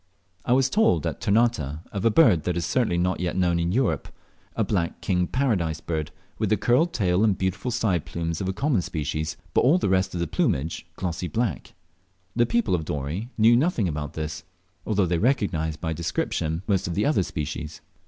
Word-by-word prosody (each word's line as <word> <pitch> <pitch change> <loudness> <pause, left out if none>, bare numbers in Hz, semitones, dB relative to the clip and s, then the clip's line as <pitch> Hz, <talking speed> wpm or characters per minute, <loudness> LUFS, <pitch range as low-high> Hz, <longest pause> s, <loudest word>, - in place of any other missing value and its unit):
I 125 - +3
was 130 0 +4
told 130 - +2
at - - -3
Ternate 115 +2 +3 0.3
of 100 -1 -3
a 115 - +5
bird 110 - +5
that 90 -1 0
is 85 - -1
certainly 115 -9 +1
not 90 +1 0
yet 90 0 -2
known 85 -2 +2
in 85 +1 0
Europe, 100 - 0 0.5
a - - +1
black 85 -5 -1
King 90 -2 0
Paradise 95 - 0
Bird, 80 -2 -3 0.3
with - - 0
the - - +3
curled 145 +9 +2
tail 95 - +1
and 105 -4 +3
beautiful 95 +5 -2
side 105 -9 0
plumes 85 0 -3
of 95 - -2
the 95 - -1
common 125 0 +1
species, 75 -1 -3 0.2
but - - +4
all 145 +8 +5
the 180 - 0
rest 95 0 +1
of - - -2
the 85 - 0
plumage 75 0 -1
glossy 90 -1 -3
black. 95 - -2 0.6
The 120 0 +3
people 115 -4 +1
of 85 -3 +1
Dorey 75 - -4
knew 115 +2 +6
nothing 125 - +2
about 75 -1 -4
this, 80 0 -5 0.4
although 105 -3 +2
they 85 -1 0
recognised 90 - 0
by 80 0 -2
description 80 0 -2
most 95 -4 +1
of 85 - -3
the 105 - +1
otter 145 -8 +3
species. 75 -2 -5
90 Hz, 200 wpm, -25 LUFS, 80-115 Hz, 0.6 s, knew